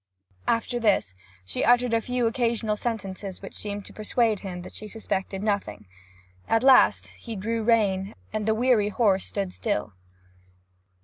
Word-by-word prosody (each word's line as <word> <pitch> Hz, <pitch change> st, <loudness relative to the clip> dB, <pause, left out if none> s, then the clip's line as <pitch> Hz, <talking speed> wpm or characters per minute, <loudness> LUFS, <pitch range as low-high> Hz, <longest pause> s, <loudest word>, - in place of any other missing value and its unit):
After 235 Hz, +1 st, 0 dB
this 205 Hz, -, +2 dB, 0.3 s
she 95 Hz, -, -3 dB
uttered 245 Hz, 0 st, +4 dB
a 230 Hz, -, +3 dB
few 250 Hz, +1 st, -1 dB
occasional 230 Hz, -2 st, 0 dB
sentences 200 Hz, -4 st, -4 dB
which 195 Hz, -, -8 dB
seemed 205 Hz, -1 st, -5 dB
to -, -, -12 dB
persuade 215 Hz, 0 st, +1 dB
him 180 Hz, -3 st, -6 dB
that -, -, -10 dB
she 215 Hz, -, -7 dB
suspected 195 Hz, -2 st, -3 dB
nothing. 200 Hz, -, -2 dB, 0.6 s
At 225 Hz, +1 st, +2 dB
last 265 Hz, -1 st, +5 dB
he 230 Hz, -2 st, -9 dB
drew 225 Hz, +3 st, -2 dB
rein, 205 Hz, -4 st, +2 dB, 0.2 s
and 215 Hz, 0 st, -2 dB
the 220 Hz, -, +3 dB
weary 230 Hz, -3 st, +3 dB
horse 200 Hz, -4 st, +2 dB
stood 195 Hz, -3 st, -3 dB
still. 205 Hz, -, -2 dB
215 Hz, 150 wpm, -26 LUFS, 195-230 Hz, 0.6 s, last